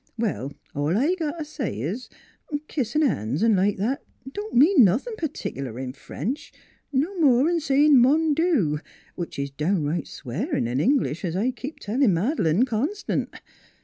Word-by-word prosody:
" - - -47
Well, 200 - -2 0.2
all 145 +6 0
I 290 +10 +2
got 330 -3 -3
t' 320 - -3
say 255 - -4
is, 190 - -4 0.6
kissin' 300 +3 0
han's, 145 - 0
V 230 - +4
like 200 -1 +2
that, 230 +8 -1 0.3
don't 415 +7 -6
mean 290 +3 +7
nothin' 230 - +2
pertic'lar 140 - -4
in 130 -1 -5
French 250 - -5 0.4
no 300 +8 0
more 270 -2 +5
'n' 340 0 +2
sayin' 290 -2 +5
Mondu 295 - +3 0.3
which 175 - -6
is 140 0 -3
downright 155 +1 -1
swearin' 120 -1 -3
in 125 +3 -1
English, 235 - +1
es 170 -2 -2
I 225 +7 +1
keep 270 +4 -7
a - - -24
tellin' 220 -2 +2
Mad'lane 200 - +2
constant. 270 - -2
240 Hz, 160 wpm, -24 LUFS, -, 0.6 s, mean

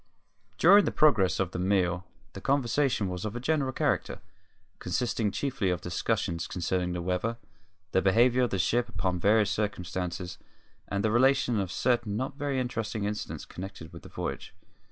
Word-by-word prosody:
During 200 - +7
the - - 0
progress 110 -12 +3
of 95 -2 0
the - - -4
meal 90 -1 +1 0.3
the - - -8
conversation 135 -4 +1
was 90 -1 -4
of 110 +1 -4
a - - -3
general 140 0 0
character, - - -1 0.6
consisting 110 +2 -1
chiefly 115 0 -1
of 90 -2 0
discussions 90 -1 -1
concerning 90 0 -1
the 90 -1 -3
weather, 90 +6 -1 0.5
the 95 - +3
behaviour 120 +6 +4
of 125 - +2
the 95 - -1
ship 120 +7 +1 0.2
under 90 -1 +1
various 105 +2 +3
circumstances, 90 -4 -3 0.5
and 100 0 -2
the 110 - +2
relation 125 -1 +3
of 95 -3 -2
certain 120 -2 0
not 130 +3 -3
very 140 -2 -1
interesting 110 -4 -3
incidents 105 +1 -4
connected 90 -3 -9
with 85 - -10
the - - -12
voyage. - - -5
105 Hz, 165 wpm, -28 LUFS, 90-125 Hz, 0.6 s, During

